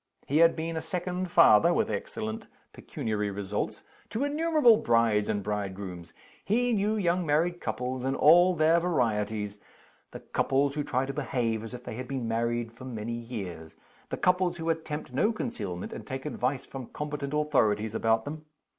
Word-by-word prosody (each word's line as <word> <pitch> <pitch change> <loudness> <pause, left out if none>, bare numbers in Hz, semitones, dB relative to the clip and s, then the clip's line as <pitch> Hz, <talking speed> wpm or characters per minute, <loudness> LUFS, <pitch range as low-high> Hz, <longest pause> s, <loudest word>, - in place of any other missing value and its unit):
He 145 - +1
had 165 0 +6
been 165 +1 -3
a 160 - -2
second 180 0 -3
father 170 +3 +6
(with - - +2
excellent 110 +1 -4 0.3
pecuniary 105 -2 -3
results) 100 +1 -3 0.3
to 225 +5 -2
innumerable 295 -5 +4
brides 115 - +2
and 100 - -1
bridegrooms. 95 -4 -4 0.3
He 240 +4 +1
knew 210 +1 +1
young 180 -3 +1
married 165 +3 +1
couples 125 0 -3
in 135 +1 0
all 175 +6 +6
their 160 +2 +4
varieties: 110 - -1 0.5
The - - -9
couples 140 +1 +1
who 150 0 -2
try 135 -2 0
to 135 - -4
behave 120 -5 -1
as 115 +2 -7
if 125 - -10
they - - -6
had 125 0 -5
been 130 -3 -3
married 115 0 -1
for 115 +3 -12
many 115 -2 -4
years; 100 -9 -6 0.3
the - - -3
couples 180 -1 +2
who 165 0 0
attempt 155 -4 -5
no 210 - +2
concealment, 95 - -4
and - - -7
take 130 +1 -6
advice 135 -2 -2
from 130 -3 -8
competent 150 -1 -4
authorities 110 -8 +1
about 110 0 +1
them. 155 +1 -7
130 Hz, 170 wpm, -28 LUFS, 110-165 Hz, 0.5 s, had